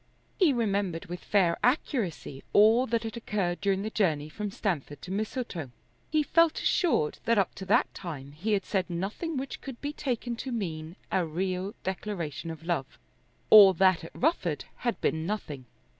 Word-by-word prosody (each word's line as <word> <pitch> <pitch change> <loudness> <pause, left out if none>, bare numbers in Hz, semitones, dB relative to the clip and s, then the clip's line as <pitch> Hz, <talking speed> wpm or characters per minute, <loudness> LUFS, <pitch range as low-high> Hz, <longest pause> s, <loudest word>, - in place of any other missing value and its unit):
He 360 -7 +5
remembered 200 -8 -1
with 175 +1 -7
fair 180 -5 +2
accuracy 215 - -1
all 225 +5 +6
that 230 0 0
had 225 -1 -5
occurred 200 -6 -2
during 195 -1 +1
the 215 - -3
journey 155 -9 +1
from 210 +6 -4
Stamford 175 - -3
to 180 - -7
Mistletoe. 205 - -3 0.4
He 305 -1 +2
felt 330 +1 +3
assured 305 - +1
that 230 -1 +3
up 195 - +2
to 190 - -8
that 195 - +2
time 145 -7 -7
he 190 +9 -2
had 195 -2 0
said 190 -3 -1
nothing 205 - -3
which 265 +1 -5
could 265 -4 -8
be 290 +1 -4
taken 245 -4 -2
to 260 - -5
mean 165 -7 -4 0.2
a 185 - +2
real 185 +4 -2
declaration 180 -4 -4
of 160 0 -7
love. 165 -6 -2 0.5
All 200 -3 +10
that 185 -1 +3
at 165 - -10
Rufford 220 - 0
had 240 -1 -2
been 160 +1 0
nothing. 150 -11 -4
195 Hz, 175 wpm, -28 LUFS, 170-230 Hz, 0.5 s, All